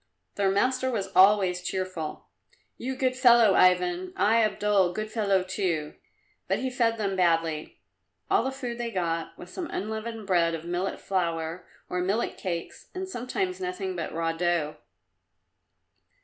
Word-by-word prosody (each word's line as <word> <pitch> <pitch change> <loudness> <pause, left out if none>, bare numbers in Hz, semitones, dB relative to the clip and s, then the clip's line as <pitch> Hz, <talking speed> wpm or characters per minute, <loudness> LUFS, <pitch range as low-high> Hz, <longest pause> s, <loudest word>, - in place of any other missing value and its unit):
Their 200 -1 +1
master 255 +6 +1
was 200 -6 -2
always 190 -2 +5
cheerful. 185 -4 -4 0.5
"You, 260 +2 -4
good 255 0 0
fellow, 240 -5 +6
Ivan! 180 0 +3
I, 225 +2 +4
Abdul, 205 -3 +2
good 215 +1 -4
fellow, 200 -5 +2
too!" 185 -5 -2 0.5
But - - +1
he 260 0 -2
fed 230 -3 +1
them 200 -3 -1
badly. 165 -4 0 0.5
All - - +3
the 265 - -1
food 250 -3 -5
they 240 -1 -2
got 170 -5 -2
was 180 - -11
some 355 -3 -4
unleavened 220 +1 -4
bread 170 -3 +2
of 165 0 -8
millet 175 +3 -2
flour, 170 -2 -2 0.2
or 180 0 -2
millet 200 +6 0
cakes, 170 -3 -5
and 375 +1 -3
sometimes 370 +6 -3
nothing 370 +1 -3
but - - -4
raw 165 0 -1
dough. 165 -2 0
195 Hz, 150 wpm, -27 LUFS, 175-235 Hz, 0.5 s, fellow